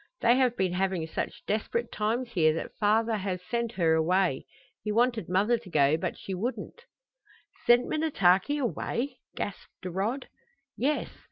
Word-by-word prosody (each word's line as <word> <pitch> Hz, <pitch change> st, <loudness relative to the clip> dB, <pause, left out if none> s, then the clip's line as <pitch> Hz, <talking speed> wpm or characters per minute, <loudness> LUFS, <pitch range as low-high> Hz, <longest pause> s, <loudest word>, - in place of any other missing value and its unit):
They 235 Hz, +1 st, +5 dB
have 250 Hz, -2 st, +2 dB
been 185 Hz, -2 st, +1 dB
having 185 Hz, -3 st, 0 dB
such 160 Hz, -, -5 dB
desperate 230 Hz, +2 st, -1 dB
times 230 Hz, +3 st, -1 dB
here 155 Hz, -5 st, +3 dB
that -, -, -5 dB
father 220 Hz, +2 st, +2 dB
has 190 Hz, -2 st, -3 dB
sent 235 Hz, +3 st, -2 dB
her 165 Hz, -5 st, +2 dB
away. 170 Hz, -2 st, +1 dB, 0.3 s
He 210 Hz, -, -2 dB
wanted 235 Hz, -4 st, +1 dB
mother 210 Hz, +6 st, +2 dB
to 215 Hz, -5 st, -13 dB
go, 145 Hz, -2 st, +4 dB
but 160 Hz, -, -3 dB
she 195 Hz, -, -6 dB
wouldn't." 250 Hz, -, -4 dB, 0.8 s
"Sent 240 Hz, +1 st, +6 dB
Minnetaki 285 Hz, -, +2 dB
away?" 265 Hz, 0 st, -2 dB, 0.2 s
gasped -, -, -7 dB
Rod. 200 Hz, +9 st, -2 dB, 0.5 s
"Yes. 295 Hz, +4 st, 0 dB
210 Hz, 150 wpm, -28 LUFS, 180-240 Hz, 0.8 s, Sent